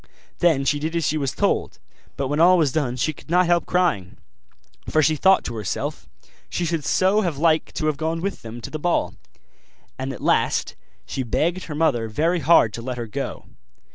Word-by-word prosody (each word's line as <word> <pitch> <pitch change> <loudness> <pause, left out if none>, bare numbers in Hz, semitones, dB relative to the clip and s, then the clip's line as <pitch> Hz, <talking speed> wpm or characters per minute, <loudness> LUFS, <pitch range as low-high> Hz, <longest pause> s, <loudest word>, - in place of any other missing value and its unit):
Then 160 -6 +3
she 145 +1 +1
did 160 +3 -3
as 165 -3 0
she 155 - +1
was 135 -5 -2
told; - - 0 0.4
but 135 - -1
when 145 +3 -1
all 180 +2 +6
was 155 -5 +2
done 135 -5 -1
she 155 +5 -1
could 150 - -17
not 180 +2 +4
help 170 -1 +1
crying, 170 - 0 0.7
for 155 - +3
she 155 +1 +3
thought 190 +6 +4
to 120 - -5
herself, 105 -5 -4 0.4
she 175 - -2
should 165 -2 -1
so 190 +7 +2
have 170 -8 -2
liked 160 +1 +1
to 155 - -2
have 155 -2 0
gone 160 +2 -2
with 195 +4 -4
them 115 +1 -8
to - - -8
the 155 - -4
ball; 175 +3 0 0.9
and 135 +1 -3
at 130 - -8
last - - +1 0.3
she 135 - -4
begged 165 - -1
her 150 - -6
mother 135 -8 +1
very 165 +11 0
hard 145 -8 +4
to 115 - -6
let 125 +1 -5
her 120 - -4
go. 105 - -5
155 Hz, 205 wpm, -22 LUFS, 130-170 Hz, 0.9 s, all